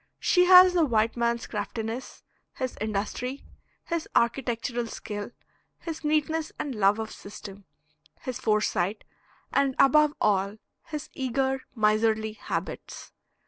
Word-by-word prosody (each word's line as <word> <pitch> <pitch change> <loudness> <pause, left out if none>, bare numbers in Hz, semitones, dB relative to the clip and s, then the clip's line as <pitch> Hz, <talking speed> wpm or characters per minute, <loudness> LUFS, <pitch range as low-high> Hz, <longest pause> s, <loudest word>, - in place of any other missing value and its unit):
She 360 -1 +4
has 365 0 +9
the 345 -2 +4
white 225 -5 +2
man's 235 0 0
craftiness, 225 +3 -5 0.3
his 255 -2 -3
industry, 220 +5 -3 0.4
his 335 -2 -3
architectural 235 0 0
skill, 205 -2 -6 0.5
his 325 -2 -7
neatness 310 +1 0
and 285 - -3
love 205 -1 +3
of 220 -1 -4
system, 200 -1 -10 0.6
his 255 -1 -5
foresight; 210 -3 0 0.5
and 275 -2 +2
above 300 +2 +5
all 200 +1 +1 0.3
his 305 -3 -6
eager, 265 +1 -1
miserly 220 0 +2
habits. - - -6
235 Hz, 115 wpm, -27 LUFS, 215-280 Hz, 0.6 s, has